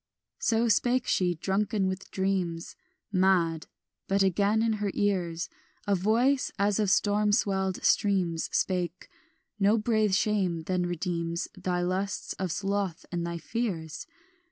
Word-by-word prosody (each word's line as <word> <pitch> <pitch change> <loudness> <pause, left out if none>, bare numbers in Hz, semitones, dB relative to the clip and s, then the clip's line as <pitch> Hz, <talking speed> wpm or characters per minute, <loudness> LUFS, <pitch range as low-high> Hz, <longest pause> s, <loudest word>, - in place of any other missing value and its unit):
So 230 +1 +2
spake 245 +3 +2
she, 180 -2 +1
drunken 195 +4 0
with 190 +1 -4
dreams, 185 -3 -2 0.4
Mad; 185 -4 +2 0.4
but 195 0 +2
again 200 +4 +2
in 225 -1 +2
her 205 - 0
ears 175 -5 0 0.4
A 205 - +1
voice 230 +8 +2
as 200 +1 +1
of 210 -2 +2
storm 205 +1 +2
swelled 190 -3 0
streams 180 -5 +2
Spake; 180 -2 -1 0.5
"No 205 +3 +4
brave 215 -3 +2
shame 190 -5 +1
then 180 +1 -1
redeems 170 -1 -2
Thy 180 -2 -2
lusts 190 +3 -2
of 185 -2 -1
sloth 195 -2 -2
and 170 -1 -2
thy 170 0 -3
fears? 170 -6 -4
190 Hz, 130 wpm, -28 LUFS, 175-205 Hz, 0.5 s, No